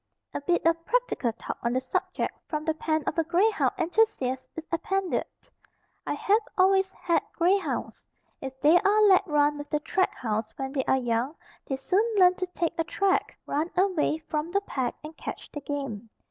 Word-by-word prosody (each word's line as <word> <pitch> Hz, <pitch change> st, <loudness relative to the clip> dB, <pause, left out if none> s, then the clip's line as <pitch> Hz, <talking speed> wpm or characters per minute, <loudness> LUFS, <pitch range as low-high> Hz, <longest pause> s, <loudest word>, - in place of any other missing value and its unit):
A -, -, -3 dB
bit 345 Hz, +4 st, +1 dB
of 330 Hz, 0 st, +2 dB
practical 485 Hz, -, 0 dB
talk -, -, -6 dB
on 235 Hz, 0 st, 0 dB
the 255 Hz, -, +2 dB
subject 260 Hz, -, -2 dB
from 305 Hz, -2 st, -3 dB
the 320 Hz, -, +1 dB
pen 315 Hz, 0 st, -1 dB
of 320 Hz, -, -1 dB
a -, -, +3 dB
grey 360 Hz, +7 st, +3 dB
hound 415 Hz, -, +1 dB
enthusiast 330 Hz, -, +1 dB
is 325 Hz, -, -5 dB
appended: 380 Hz, +2 st, 0 dB, 0.8 s
I -, -, 0 dB
have 420 Hz, +3 st, +2 dB, 0.2 s
always 385 Hz, 0 st, +4 dB
had 345 Hz, -2 st, 0 dB
grey 360 Hz, +3 st, +3 dB
hounds. -, -, -4 dB, 0.4 s
If 265 Hz, -1 st, -7 dB
they 310 Hz, +5 st, +6 dB
are 420 Hz, +2 st, +3 dB
let 395 Hz, -1 st, +5 dB
run 295 Hz, -1 st, +2 dB
with 290 Hz, -, -7 dB
the 300 Hz, -, +1 dB
track 375 Hz, +4 st, 0 dB
hounds 220 Hz, -2 st, -3 dB
when 270 Hz, -1 st, -3 dB
they 265 Hz, -3 st, -1 dB
are 265 Hz, -, +3 dB
young 245 Hz, +3 st, -1 dB, 0.3 s
they 270 Hz, -, -1 dB
soon 365 Hz, +10 st, +1 dB
learn 365 Hz, -2 st, +6 dB
to 370 Hz, -, -2 dB
take 350 Hz, -2 st, -2 dB
a -, -, +3 dB
track, 385 Hz, +3 st, 0 dB
run 310 Hz, +4 st, -1 dB
away 360 Hz, -5 st, +2 dB
from 305 Hz, +1 st, -2 dB
the 400 Hz, +3 st, +1 dB
pack 260 Hz, -10 st, -2 dB
and 310 Hz, +1 st, -9 dB
catch -, -, -7 dB
the 295 Hz, -, -6 dB
game. 275 Hz, -7 st, -5 dB
320 Hz, 195 wpm, -27 LUFS, 275-375 Hz, 0.8 s, they